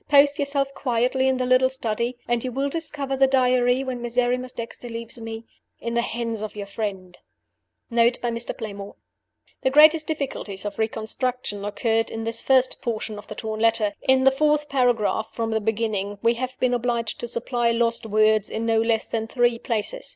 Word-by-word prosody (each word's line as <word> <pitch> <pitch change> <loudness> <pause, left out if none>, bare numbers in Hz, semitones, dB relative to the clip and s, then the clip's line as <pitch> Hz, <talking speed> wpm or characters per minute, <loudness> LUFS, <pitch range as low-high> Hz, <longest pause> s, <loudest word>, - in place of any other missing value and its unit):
Post 285 0 +5
yourself 280 -1 0
quietly 255 +1 +1
in 260 -1 +2
the 255 - -1
little 255 +1 +4
study; 240 -1 -2
and 240 -1 0
you 255 - -3
will 275 +3 -1
discover 285 -3 -3
the 270 0 +4
Diary 255 -1 +3
(when 255 -2 -4
Miserrimus 250 +1 0
Dexter 235 +1 -7
leaves 230 +1 -6
me) 225 0 -7 0.3
in 235 - -4
the 235 - +2
hands 230 -2 -3
of 215 -1 -5
your 205 -1 -5
friend." 195 -3 -5 0.7
Note 235 +1 +3
by 240 - -2
Mr. 230 +1 -2
Playmore: 200 -3 -7 0.7
The 260 - +2
greatest 305 +3 +6
difficulties 265 -10 -3
of 205 +1 -5
reconstruction 220 0 -2
occurred 225 +2 0
in 225 - -5
this 230 0 0
first 260 -1 +2
portion 220 -3 -3
of - - -13
the - - -7
torn 220 -1 -4
letter. 225 -2 +2
In 260 0 +3
the 270 - +6
fourth 295 +1 +1
paragraph 240 -4 +1
from 225 -1 -2
the 220 0 0
beginning 210 -2 -1
we 230 - +4
have 255 +2 -5
been 250 -1 +2
obliged 235 -2 -1
to 240 - -4
supply 235 0 -1
lost 230 0 +1
words 215 -1 +3
in 225 +1 -3
no 225 -1 +3
less 225 -1 +1
than 225 -1 -3
three 240 -1 +1
places. 240 - -2
235 Hz, 190 wpm, -24 LUFS, 225-260 Hz, 0.7 s, greatest